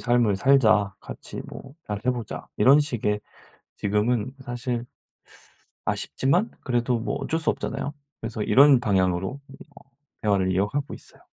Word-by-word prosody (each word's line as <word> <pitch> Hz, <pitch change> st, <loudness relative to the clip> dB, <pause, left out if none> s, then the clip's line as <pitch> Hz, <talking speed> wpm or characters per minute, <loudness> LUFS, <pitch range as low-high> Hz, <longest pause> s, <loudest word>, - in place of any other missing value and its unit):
삶을 120 Hz, -4 st, +2 dB
살자. 110 Hz, -6 st, +4 dB
같이 -, -, -8 dB
뭐 135 Hz, +1 st, -11 dB
잘해 105 Hz, 0 st, -4 dB
보자.' 120 Hz, -3 st, -6 dB
이런 140 Hz, +3 st, +6 dB
식의 110 Hz, -8 st, -1 dB, 0.6 s
지금은 105 Hz, +4 st, 0 dB
사실 120 Hz, -1 st, -3 dB, 1.0 s
아쉽지만 175 Hz, +11 st, 0 dB
그래도 120 Hz, -1 st, 0 dB
뭐 115 Hz, -, -3 dB
어쩔 160 Hz, -, -2 dB
수 160 Hz, -, 0 dB
없잖아요. 145 Hz, -, -4 dB, 0.3 s
그래서 115 Hz, -1 st, -3 dB
이런 140 Hz, +2 st, +6 dB
방향으로 95 Hz, +2 st, 0 dB
이 -, -, -12 dB, 0.2 s
뭐 -, -, -16 dB, 0.4 s
대화를 100 Hz, -3 st, +2 dB
이어가고 105 Hz, +10 st, -1 dB
있어요. -, -, -17 dB
120 Hz, 295 characters per minute, -25 LUFS, 105-135 Hz, 1.0 s, 이런